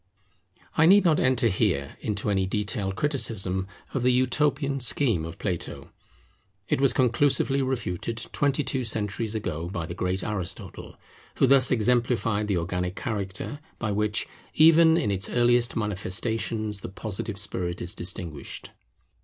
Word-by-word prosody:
I 160 - +6
need 200 +1 +6
not 160 -3 +4
enter 130 -1 +2
here 95 -9 0
into 105 0 -2
any 95 -1 +1
detailed 100 -1 -2
criticism 100 - 0 0.3
of 135 - -1
the 125 +1 +3
utopian 135 +2 +1
scheme 120 - +3
of 85 0 -8
Plato. 90 -5 -4 0.8
It - - 0
was 135 - +5
conclusively 135 +2 +2
refuted 115 -5 -3 0.2
twenty 145 0 +1
two 130 -2 -2
centuries 110 0 -1
ago, 85 -5 -3
by 85 -3 -4
the 85 - -6
great 90 +1 -2
Aristotle, 105 -5 -4 0.4
who - - +4
thus 130 -1 +5
exemplified 115 -2 +1
the 100 -3 0
organic 90 +2 -2
character, 105 +4 -4 0.2
by 110 -2 -2
which, 105 +1 -1 0.3
even 160 +1 +6
in 105 - 0
its 95 -1 -2
earliest 120 0 +2
manifestations, 105 +1 -2
the - - -6
Positive 100 +1 -5
spirit 90 -3 -3
is 85 - -2
distinguished. 85 -5 -4
110 Hz, 140 wpm, -26 LUFS, 95-130 Hz, 0.8 s, I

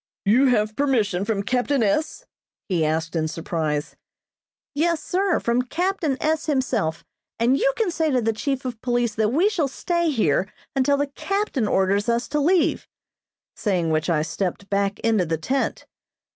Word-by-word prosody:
"You 235 +7 +5
have 215 -3 +1
permission 220 -9 +1
from 205 -3 -1
captain 250 +3 +1
S.?" 305 - -1 0.4
he 175 -5 +1
asked 160 +2 -1
in 160 -1 +1
surprise. 155 -2 -3 0.8
"Yes, 325 +2 0
sir, 380 0 +1
from 235 +1 +1
captain 325 +1 -1
S. 315 +1 0
himself, 240 - -1 0.3
and 235 +3 +3
you - - +2
can 440 -6 +1
say 325 -2 0
to 260 -3 +2
the 225 -1 0
chief 270 +4 -2
of 240 -3 -5
police 240 -2 0
that 215 0 +1
we 330 +10 +3
shall 365 -9 0
stay 340 +5 -1
here 205 - +1 0.2
until 275 +1 +3
the 285 - +1
captain 290 - -2
orders 200 +3 +1
us 235 +1 0
to 295 - 0
leave," 340 +4 +2 0.7
saying 180 -6 0
which 155 +2 0
I 155 -3 +2
stepped 185 +5 -4
back 200 0 +1
into 225 -4 +2
the 165 -1 -1
tent. 260 - -2
240 Hz, 165 wpm, -23 LUFS, 195-290 Hz, 0.8 s, You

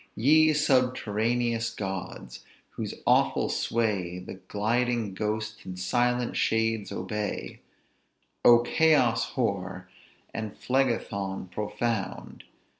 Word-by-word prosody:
"Ye 155 +6 +5
subterraneous 120 -4 +1
gods! 95 - -6 0.3
whose - - -5
awful - - +3
sway 100 -6 -1
The 90 - -8
gliding 110 +2 -1
ghosts, 110 +2 -3
and 90 -1 -7
silent 120 +6 0
shades 110 -1 0
obey: 105 +3 -4 0.8
O 120 0 +8
Chaos 120 -4 +3
hoar! 95 -6 -2 0.4
and 110 -2 -5
Phlegethon 100 -8 -1
profound! 105 +1 -3
110 Hz, 90 wpm, -27 LUFS, 100-120 Hz, 0.8 s, O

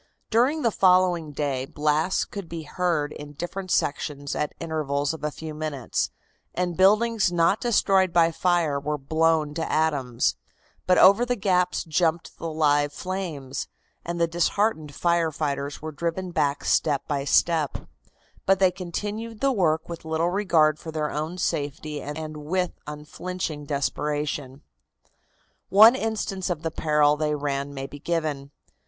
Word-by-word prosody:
During 260 +7 +2
the 230 - +3
following 180 -5 +3
day 140 -3 -2
blasts 155 +6 +1
could 200 -5 -8
be 165 -1 -5
heard 160 -2 -1
in 145 0 -9
different 185 +5 -5
sections 145 -3 -1
at 150 - -2
intervals 145 -3 -1
of 155 -2 -9
a 150 - 0
few 155 +1 -8
minutes, 150 -5 -2 0.5
and 175 -1 -1
buildings 210 +2 +3
not 175 +4 +2
destroyed 195 -6 +3
by 170 -1 +4
fire 165 -4 +1
were 150 +1 -2
blown 155 +1 +1
to 160 +1 -3
atoms, 140 -7 +1 0.5
but 180 - +5
over 200 +5 +7
the 245 0 0
gaps 185 -4 +1
jumped 165 0 -1
the 165 - -4
live 145 -2 +2
flames, 155 -8 -4 0.4
and 170 0 -4
the 170 - +4
disheartened 170 -2 0
fire 170 -2 +1
fighters 145 -2 -3
were 155 - -4
driven 170 +4 -3
back 145 -4 0
step 145 -3 +1
by 140 -2 -1
step; 155 +1 +2 0.7
but 195 0 +5
they 185 -1 +4
continued 210 +5 -5
the 275 0 +2
work 160 -8 +1
with 170 -1 -7
little 160 +2 0
regard 165 -6 +3
for 160 - -7
their 155 -1 -2
own 155 +4 -3
safety 150 -2 -2
and 155 +1 -6
with 175 +4 -1 0.2
unflinching 150 +1 -5
desperation. 145 -1 -2 1.1
One 220 +4 +8
instance 220 -6 -2
of 165 -3 -3
the 160 - -2
peril 150 -2 +2
they 150 -1 0
ran 140 -1 -2
may 135 -1 -5
be 145 +1 -10
given. 150 -4 -2
160 Hz, 150 wpm, -25 LUFS, 150-180 Hz, 1.1 s, One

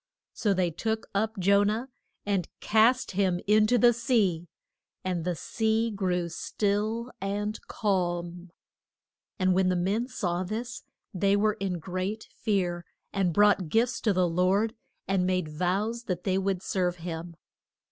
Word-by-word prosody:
So 205 -3 +1
they 180 -2 +1
took 220 +7 -2
up 220 +2 0
Jo 200 +2 +4
nah, 215 +4 0 0.4
and 195 -4 0
cast 225 +4 +3
him 185 -2 +1
in 215 +1 +4
to 245 - +3
the 240 +1 +6
sea, 205 -8 +1 0.6
and 180 -3 -2
the 180 -1 0
sea 220 +6 0
grew 180 -4 -1
still 210 +7 -1
and 205 +2 -2
calm. 175 -3 -2 0.9
And 185 -2 +2
when 185 0 +3
the 180 - +1
men 200 +7 0
saw 180 -8 -2
this 225 +6 -5 0.3
they 195 +2 +2
were 215 +1 +2
in 195 -4 -3
great 185 +5 -4
fear, 180 -5 -1 0.3
and 195 -3 +1
brought 205 -2 +3
gifts 230 +6 +1
to 220 - +2
the 185 -2 +2
Lord, 185 +6 +2 0.3
and 190 -2 +1
made 185 -4 0
vows 195 +9 -1
that 180 -3 -3
they 190 -1 +1
would 195 -1 -1
serve 180 -2 0
him. 170 0 -6
195 Hz, 150 wpm, -28 LUFS, 180-215 Hz, 0.9 s, the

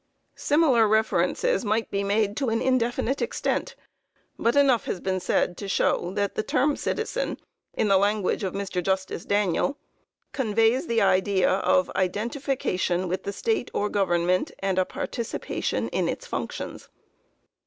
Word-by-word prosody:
Similar 285 -7 +3
references 220 - +1
might 220 +1 -1
be 200 0 -1
made 205 +1 +1
to 270 -4 0
an 225 0 +1
indefinite 255 +1 0
extent, - - -2 0.6
but 235 +3 +2
enough 275 -5 +4
has 185 - -3
been 185 0 -1
said 180 -1 0
to 200 - -6
show 175 -2 +1
that 200 -1 0
the - - -1
term 280 +6 +1
citizen, 470 +3 -2 0.4
in - - +1
the 195 -1 +5
language 205 0 +1
of 190 - -3
Mr. 195 -2 -2
Justice 190 -1 -2
Daniel, 205 - +1 0.5
conveys 225 +4 +1
the 230 -2 +2
idea 190 0 +3
"of 275 +9 +2
identification 190 -3 -1
with 185 +2 -2
the 200 - -4
state 430 - -1
or 210 - 0
government, 180 -2 +1
and 190 -1 0
a 185 - +2
participation 235 +4 -3
in - - 0
its - - -4
functions." - - -5
205 Hz, 145 wpm, -25 LUFS, 190-250 Hz, 0.6 s, the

